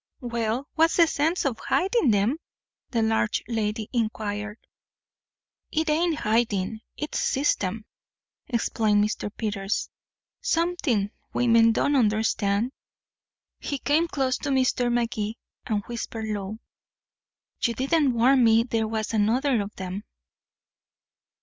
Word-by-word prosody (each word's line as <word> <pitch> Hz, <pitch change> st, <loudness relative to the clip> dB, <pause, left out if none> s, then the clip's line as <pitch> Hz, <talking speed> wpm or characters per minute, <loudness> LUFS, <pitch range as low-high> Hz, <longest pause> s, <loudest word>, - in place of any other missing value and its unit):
"Well, 235 Hz, +2 st, -2 dB
what's 325 Hz, +1 st, +3 dB
the 340 Hz, -, +7 dB
sense 320 Hz, +2 st, 0 dB
in 275 Hz, -, +2 dB
hiding 380 Hz, -, +2 dB
'em?" 210 Hz, +9 st, +1 dB, 0.5 s
the 230 Hz, -3 st, +1 dB
large 220 Hz, -1 st, +1 dB
lady 220 Hz, -2 st, -2 dB
inquired. 215 Hz, -2 st, -2 dB, 1.1 s
"It 315 Hz, 0 st, +1 dB
ain't 330 Hz, +1 st, +2 dB
hiding 220 Hz, -1 st, 0 dB, 0.2 s
it's 300 Hz, -, -3 dB
system," 220 Hz, -7 st, 0 dB, 0.6 s
explained 220 Hz, -4 st, +1 dB
Mr. 210 Hz, 0 st, -2 dB
Peters. 205 Hz, -2 st, -2 dB, 0.5 s
"Something 330 Hz, -, 0 dB, 0.2 s
women 230 Hz, -2 st, +5 dB
don't 285 Hz, +5 st, +1 dB
understand." 215 Hz, -1 st, +1 dB, 0.9 s
He 285 Hz, -, -3 dB
came 305 Hz, +5 st, +2 dB
close 265 Hz, -5 st, -1 dB
to 290 Hz, -, -3 dB
Mr. 255 Hz, -2 st, +2 dB
Magee, 230 Hz, -2 st, -1 dB, 0.3 s
and 210 Hz, -4 st, 0 dB
whispered 230 Hz, -1 st, -5 dB
low: 210 Hz, -1 st, -4 dB, 1.0 s
"You 235 Hz, -, +1 dB
didn't 275 Hz, +1 st, +2 dB
warn 255 Hz, +2 st, +5 dB
me 225 Hz, 0 st, +5 dB
there 225 Hz, -2 st, -1 dB
was 220 Hz, 0 st, -3 dB
another 230 Hz, +4 st, +2 dB
of 205 Hz, +1 st, -6 dB
'em." 190 Hz, +2 st, -5 dB
230 Hz, 115 wpm, -25 LUFS, 215-270 Hz, 1.1 s, the